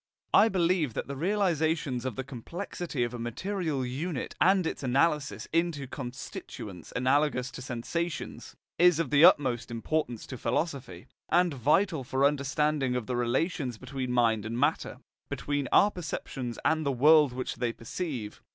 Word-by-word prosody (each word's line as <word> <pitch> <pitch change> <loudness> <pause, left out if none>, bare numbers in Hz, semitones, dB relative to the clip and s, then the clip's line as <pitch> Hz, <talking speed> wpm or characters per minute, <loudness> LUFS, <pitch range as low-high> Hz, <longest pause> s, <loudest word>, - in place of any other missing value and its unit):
I 220 - +7
believe 170 - +1
that - - -2
the 140 - -5
realization 160 - 0
of 125 - -4
the 130 - -3
complexity 145 - -4
of 120 0 -3
a 120 - -5
material 145 - -2
unit, 140 +4 -4
and 190 -1 +4
its - - -3
analysis 140 +3 +1
into 165 -4 0
constituents 125 - -8
analogous 130 0 +1
to - - -8
sensations, 145 +7 -4 0.2
is 175 -2 +6
of 165 -6 -1
the 145 +1 +5
utmost 125 -8 +5
importance 120 +1 -2
to 130 - -8
philosophy, 120 - -2 0.2
and 175 -1 +3
vital 150 - +2
for 130 +2 -1
any - - +7
understanding 140 -1 0
of 125 -3 -2
the 125 - -2
relations 125 - -1
between 130 0 -5
mind 115 -3 +2
and 115 +2 -4
matter, 145 +5 0 0.3
between 145 -2 -2
our 205 - +6
perceptions 135 - -5
and 160 0 +2
the 140 - +1
world 150 +2 +5
which 125 -1 -4
they 120 -1 0
perceive. 115 - -5
140 Hz, 155 wpm, -29 LUFS, 125-160 Hz, 0.3 s, I